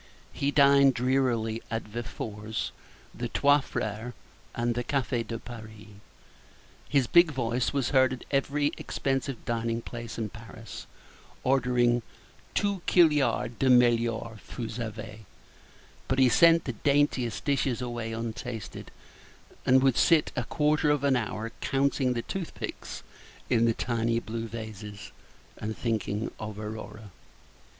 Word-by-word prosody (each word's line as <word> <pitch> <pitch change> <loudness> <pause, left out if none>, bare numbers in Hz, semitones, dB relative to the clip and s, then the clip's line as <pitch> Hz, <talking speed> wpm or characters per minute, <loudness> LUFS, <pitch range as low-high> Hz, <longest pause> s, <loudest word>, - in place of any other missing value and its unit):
He 140 - 0
dined 140 -2 +6
drearily 120 -3 +1
at 115 -1 -2
Véfour's, 110 -1 -5 0.4
the - - -4
Trois 145 +1 +4
Frères, 110 -1 -4 0.4
and 120 0 0
the 120 +1 -2
Café 125 -2 -1
de 115 - -3
Paris. 110 -3 -10 1.0
His 140 -3 +3
big 170 +6 +6
voice 125 -3 -1
was 140 -4 0
heard 130 -2 +5
at 130 - -8
every 145 +1 +1
expensive 135 -2 -2
dining 115 0 -1
place 115 -1 -7
in 110 -2 -2
Paris, 115 +1 -10 0.6
ordering 125 -2 +3 0.5
"Toos 200 -3 0
killyar 150 -7 +4
de 135 - +3
mellyour: 115 -2 +3
vous 115 -2 -6
savez;" 110 -1 -6 0.9
but 130 - 0
he 130 -1 +6
sent 165 +5 +6
the 125 - -2
daintiest 135 -3 +1
dishes 135 -4 +1
away 120 -2 -4
untasted, 115 -1 -5 0.8
and 130 +1 +6
would 135 -3 +3
sit 165 -3 +4
for 125 - -1
a - - -6
quarter 150 +1 +2
of 145 -1 +2
an 140 -2 +4
hour 115 -1 -2
counting 135 -1 +1
the 115 -1 -3
toothpicks 190 -4 -6 0.5
in 115 -1 +4
the 115 - +3
tiny 115 -1 0
blue 115 0 -5
vases, 105 -2 -8 0.5
and 110 +1 -4
thinking 110 -2 -2
of 110 -1 -6
Aurora. 110 -1 -7
120 Hz, 130 wpm, -28 LUFS, 115-135 Hz, 1.0 s, dined